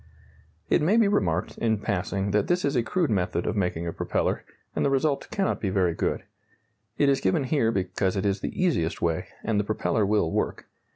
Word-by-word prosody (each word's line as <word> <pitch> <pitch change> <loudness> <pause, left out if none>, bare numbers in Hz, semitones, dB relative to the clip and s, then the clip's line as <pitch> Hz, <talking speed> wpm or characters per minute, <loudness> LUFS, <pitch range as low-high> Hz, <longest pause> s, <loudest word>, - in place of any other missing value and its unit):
It - - +3
may 185 +9 +3
be 225 -3 +5
remarked, 90 - 0
in 110 -2 +1
passing, 100 -1 -2
that 105 0 +2
this 175 +1 +1
is 140 0 0
a 120 - +3
crude 155 +6 0
method 90 -3 0
of - - -1
making 90 -4 -1
a 85 - -3
propeller, - - -1 0.3
and - - 0
the - - +3
result 140 +1 0
cannot 195 -1 -1
be 100 - 0
very 95 -3 +2
good. - - -1 0.7
It 145 - +3
is 140 -1 +3
given 95 +9 +2
here 130 -4 +1
because 95 -1 -1
it 95 - -1
is 100 0 +1
the - - -5
easiest 160 - +1
way, 85 -2 0 0.2
and 110 -2 +1
the - - +1
propeller 110 +1 0
will 100 -5 +2
work. - - -2
105 Hz, 210 wpm, -26 LUFS, 95-140 Hz, 0.7 s, be